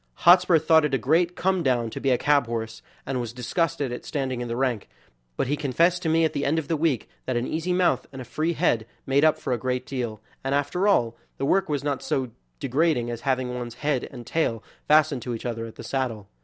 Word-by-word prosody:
Hotspur 180 0 +7
thought 160 0 +4
it 150 -2 +1
a - - +2
great 170 +7 +2
come 190 0 +1
down 120 -5 +1
to - - -5
be 135 - +1
a 125 - +4
cab 145 -2 +2
horse, 115 -1 -4 0.2
and 130 -2 -2
was 120 -1 -5
disgusted 140 +1 -1
at 125 - -5
standing 130 -4 -3
in 120 - -3
the 115 - -3
rank, 125 - -1 0.5
but - - +1
he 140 +3 0
confessed 165 +5 +2
to 165 - -1
me 165 +1 +3
at 160 - -1
the 140 - -2
end 145 +3 +1
of 160 -3 -2
the 165 - 0
week 150 -6 0 0.2
that 130 - -1
an 120 - -1
easy 165 +5 -2
mouth 180 0 +2
and 135 - -9
a 125 - -7
free 160 +6 -1
head 115 -7 +1 0.2
made 135 +2 +2
up 155 -1 +5
for 130 - -2
a 120 - -1
great 125 +1 -2
deal, 120 -6 -4 0.2
and 135 +1 0
after 160 +8 0
all, 115 - +3 0.2
the 135 - -1
work 190 +4 +2
was 145 -2 -1
not 145 -2 -1
so 130 -3 -2 0.3
degrading 135 -3 +1
as 115 -1 -5
having 130 -2 -1
one's 120 -1 -5
head 145 -1 -1
and 120 -3 -9
tail 115 -9 -1 0.2
fastened 150 -3 +4
to 120 0 -3
each 115 - -8
other 115 -1 -3
at 115 - -12
the - - -9
saddle. 120 -7 -3
135 Hz, 245 wpm, -25 LUFS, 120-160 Hz, 0.5 s, Hotspur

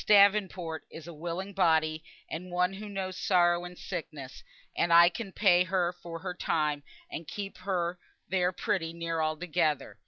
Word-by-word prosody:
Davenport 200 -5 +4
is 160 - -10
a 170 - -8
willing 175 +5 -5
body, 160 -4 +2 0.2
and 180 +3 -6
one 180 +1 +1
who 210 +2 -7
knows 190 -2 -4
sorrow 175 -2 +3
and 180 0 -9
sickness, 140 -4 -7 0.3
and 170 - +1
I 170 +1 +8
can 195 +3 -6
pay 180 -3 +4
her 180 -1 +1
for 170 -1 -8
her 180 +1 -4
time, 150 -4 0 0.3
and 160 - -6
keep 200 -2 -6
her 180 -2 -2 0.3
there 180 -1 +1
pretty 170 -2 -2
near 165 -1 -2
altogether. 155 -1 -1
175 Hz, 160 wpm, -30 LUFS, 165-185 Hz, 0.3 s, I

